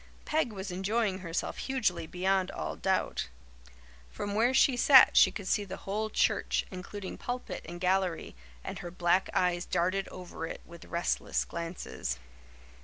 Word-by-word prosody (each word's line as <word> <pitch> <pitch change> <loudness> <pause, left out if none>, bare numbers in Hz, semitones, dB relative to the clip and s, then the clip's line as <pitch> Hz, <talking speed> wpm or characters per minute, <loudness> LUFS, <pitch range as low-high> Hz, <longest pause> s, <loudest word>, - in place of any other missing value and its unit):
Peg 305 -6 +1
was 195 -2 -6
enjoying 195 +1 0
herself 170 -2 -3
hugely, 215 -11 -1
beyond 190 +2 +1
all - - -4
doubt. 190 - -1 0.8
From 205 - -4
where 230 +4 +3
she 260 0 +4
sat 260 +1 +8
she - - +8
could 200 -3 -7
see 205 - +2
the 190 -1 -7
whole 215 +3 -1
church, - - +1
including 190 +1 -7
pulpit 250 +1 -4
and 175 0 -7
gallery, 185 - 0 0.3
and - - -5
her 175 - -6
black 175 +1 +1
eyes 175 -1 +2
darted 185 +3 0
over 175 -2 -7
it - - -7
with 170 0 -12
restless 170 +1 -1
glances. 165 - -5
190 Hz, 150 wpm, -30 LUFS, 175-210 Hz, 0.8 s, sat